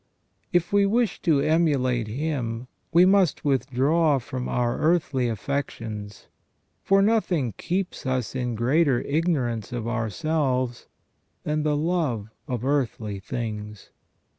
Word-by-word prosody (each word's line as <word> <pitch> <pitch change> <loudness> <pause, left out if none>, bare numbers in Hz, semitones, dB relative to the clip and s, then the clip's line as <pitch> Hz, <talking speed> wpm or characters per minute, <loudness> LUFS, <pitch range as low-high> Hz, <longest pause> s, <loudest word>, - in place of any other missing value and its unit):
If 175 +1 +1
we 200 -1 +5
wish 230 0 +1
to 155 -6 +3
emulate 140 -7 +2
him 125 -2 -3 0.2
we 170 +2 +6
must 190 -5 +3
withdraw 140 +3 +2
from 130 0 -5
our 120 -1 0
earthly 155 -7 +1
affections, 110 -4 -4 0.6
for 195 0 +4
nothing 185 - +1
keeps 180 -4 -2
us 130 -3 -1
in 125 -2 -2
greater 130 +3 +2
ignorance 140 - -1
of 120 -2 -3
ourselves 125 +2 -1 0.6
than 150 0 0
the 150 -1 +1
love 145 - -1 0.2
of 125 -1 -3
earthly 120 -7 -1
things. 105 -1 -6
135 Hz, 115 wpm, -25 LUFS, 120-160 Hz, 0.6 s, we